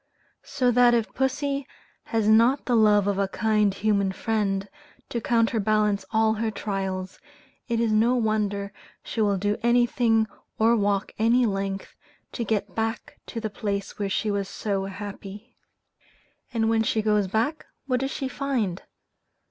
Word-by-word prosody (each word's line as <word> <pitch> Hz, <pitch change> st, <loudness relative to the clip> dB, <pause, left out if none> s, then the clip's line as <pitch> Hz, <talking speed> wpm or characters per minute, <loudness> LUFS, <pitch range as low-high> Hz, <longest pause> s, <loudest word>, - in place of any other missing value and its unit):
So 250 Hz, -2 st, +1 dB
that 245 Hz, 0 st, +5 dB
if 230 Hz, -2 st, -1 dB
pussy 275 Hz, +1 st, -1 dB, 0.4 s
has 225 Hz, -3 st, 0 dB
not 230 Hz, +5 st, +4 dB
the 245 Hz, -, +1 dB
love 210 Hz, -3 st, +5 dB
of 200 Hz, -1 st, 0 dB
a 200 Hz, -, +1 dB
kind 210 Hz, 0 st, +1 dB
human 200 Hz, -1 st, +1 dB
friend, 200 Hz, -2 st, -1 dB, 0.4 s
to 235 Hz, -, -3 dB
counterbalance 215 Hz, -3 st, +1 dB
all 220 Hz, 0 st, +3 dB
her 220 Hz, +1 st, -1 dB
trials, 190 Hz, -3 st, -4 dB, 0.5 s
it 235 Hz, -2 st, 0 dB
is 230 Hz, -1 st, +1 dB
no 225 Hz, +4 st, +3 dB
wonder 210 Hz, -3 st, -1 dB, 0.3 s
she 225 Hz, -, -3 dB
will 205 Hz, -2 st, +2 dB
do 205 Hz, +2 st, 0 dB
anything 240 Hz, -1 st, +3 dB, 0.3 s
or 225 Hz, +2 st, +4 dB
walk 200 Hz, -2 st, 0 dB
any 235 Hz, +3 st, +4 dB
length, 195 Hz, -2 st, -3 dB, 0.4 s
to 240 Hz, -, -3 dB
get 205 Hz, -3 st, -2 dB
back 225 Hz, +1 st, -3 dB
to 230 Hz, -, -5 dB
the 220 Hz, -2 st, -4 dB
place 200 Hz, -1 st, -4 dB
where 200 Hz, -1 st, -1 dB
she 210 Hz, +2 st, 0 dB
was 200 Hz, -1 st, -2 dB
so 200 Hz, -2 st, -2 dB
happy. 200 Hz, +2 st, -8 dB, 1.0 s
And 225 Hz, -2 st, 0 dB
when 225 Hz, 0 st, +2 dB
she 220 Hz, 0 st, 0 dB
goes 210 Hz, -2 st, +2 dB
back, 225 Hz, -, -1 dB, 0.2 s
what 255 Hz, -2 st, 0 dB
does 270 Hz, +1 st, -1 dB
she 270 Hz, -, -3 dB
find? 250 Hz, -9 st, -2 dB
220 Hz, 155 wpm, -25 LUFS, 200-235 Hz, 1.0 s, that